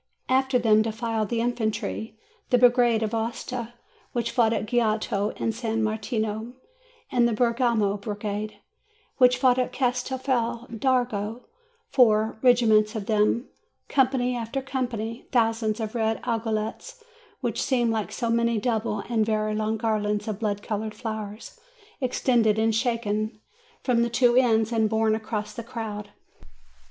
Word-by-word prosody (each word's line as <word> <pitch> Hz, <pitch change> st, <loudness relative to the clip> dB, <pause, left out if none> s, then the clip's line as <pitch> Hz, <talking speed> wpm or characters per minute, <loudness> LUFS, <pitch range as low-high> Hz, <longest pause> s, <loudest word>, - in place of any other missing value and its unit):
After 265 Hz, 0 st, +3 dB
them 220 Hz, -3 st, +4 dB
defiled 225 Hz, -1 st, -2 dB
the 235 Hz, -1 st, 0 dB
infantry, 220 Hz, -2 st, -2 dB, 0.3 s
the 250 Hz, -, +4 dB
brigade 240 Hz, -2 st, +4 dB
of 215 Hz, +1 st, -2 dB
Aosta, 230 Hz, +1 st, -3 dB, 0.4 s
which 235 Hz, -1 st, -1 dB
fought 230 Hz, -3 st, +3 dB
at 225 Hz, -, -1 dB
Goito 215 Hz, -3 st, 0 dB
and -, -, 0 dB
at -, -, -1 dB
San 225 Hz, -1 st, -2 dB
Martino, 220 Hz, +1 st, -2 dB, 0.6 s
and 240 Hz, -1 st, +4 dB
the 235 Hz, -, 0 dB
Bergamo 235 Hz, -3 st, +1 dB
brigade, 210 Hz, 0 st, -4 dB, 0.6 s
which 250 Hz, -1 st, +5 dB
fought 255 Hz, -1 st, +3 dB
at 250 Hz, -, 0 dB
Castelfi 250 Hz, -2 st, -1 dB
dardo, 245 Hz, -4 st, 0 dB, 0.5 s
four 220 Hz, -5 st, +3 dB
regiments 230 Hz, -3 st, +4 dB
of 210 Hz, -3 st, -3 dB
them, 215 Hz, +3 st, +2 dB, 0.4 s
company 255 Hz, -2 st, +2 dB
after 235 Hz, +3 st, -3 dB
com 265 Hz, -1 st, -2 dB
pany, 230 Hz, 0 st, -6 dB
thousands 225 Hz, -2 st, +1 dB
of 220 Hz, -1 st, -3 dB
red 225 Hz, -2 st, 0 dB
aiguillettes, 225 Hz, -, -3 dB, 0.4 s
which -, -, -1 dB
seemed 240 Hz, -4 st, +1 dB
like 220 Hz, -2 st, -2 dB
so 235 Hz, -2 st, -2 dB
many 235 Hz, 0 st, +2 dB
double 215 Hz, -2 st, -1 dB
and 230 Hz, -2 st, +1 dB
very 215 Hz, 0 st, 0 dB
long 215 Hz, +1 st, -1 dB
garlands 210 Hz, -2 st, -1 dB
of 215 Hz, -2 st, -3 dB
blood 205 Hz, -2 st, -2 dB
colored 215 Hz, 0 st, -3 dB
flowers, 215 Hz, -, -6 dB, 0.4 s
extended 240 Hz, -4 st, +2 dB
and 220 Hz, 0 st, +2 dB
shaken 215 Hz, -2 st, -1 dB, 0.4 s
from 245 Hz, -3 st, +2 dB
the 235 Hz, -, +1 dB
two 240 Hz, 0 st, +3 dB
ends, 225 Hz, -3 st, +3 dB
and 220 Hz, -2 st, +2 dB
borne 220 Hz, 0 st, +2 dB
across 215 Hz, -1 st, -3 dB
the -, -, -5 dB
crowd. 220 Hz, -3 st, -6 dB
225 Hz, 145 wpm, -25 LUFS, 215-245 Hz, 0.6 s, which